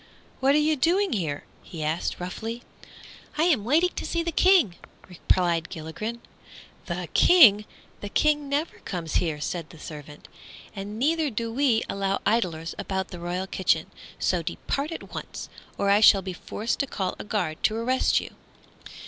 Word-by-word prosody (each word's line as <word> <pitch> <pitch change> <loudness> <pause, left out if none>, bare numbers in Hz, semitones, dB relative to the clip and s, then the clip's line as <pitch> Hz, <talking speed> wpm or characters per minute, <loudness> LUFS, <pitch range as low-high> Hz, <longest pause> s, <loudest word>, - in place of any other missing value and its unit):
"What 270 +2 +4
are - - +5
you 305 +1 +3
doing 355 +7 +2
here?" 160 -9 -2 0.2
he 160 -3 -7
asked, 155 +3 -2
roughly. 225 +6 -5 0.7
"I 310 - +3
am 310 - +3
waiting 320 - +3
to - - -2
see 335 -1 -1
the 335 - -2
King," 335 - +4 0.3
replied 175 -2 0
Gilligren. 190 +9 -6 0.7
"The - - -3
King! 220 - +7 0.3
The 205 - -6
King 295 +3 +1
never 290 +4 -2
comes 170 -4 -3
here," 160 -4 -1
said 165 +1 -4
the 165 - -13
servant; 150 -1 -10 0.5
"and 205 +2 -6
neither 310 +4 +1
do 230 -1 -3
we 250 -4 +2
allow 195 0 -1
idlers 175 -7 0
about 190 -1 -3
the 175 - -8
royal 175 +2 -3
kitchen. 190 -1 0 0.3
So - - +1
depart 285 +4 -3
at 330 - -8
once, - - -7 0.3
or 200 - +2
I 200 - +5
shall 200 -2 +7
be 185 0 -4
forced 215 +5 -3
to 280 - 0
call 190 -6 -3
a - - -5
guard 185 -7 -2
to 215 - +2
arrest 250 +3 +2
you." - - -9
210 Hz, 165 wpm, -26 LUFS, 175-280 Hz, 0.7 s, King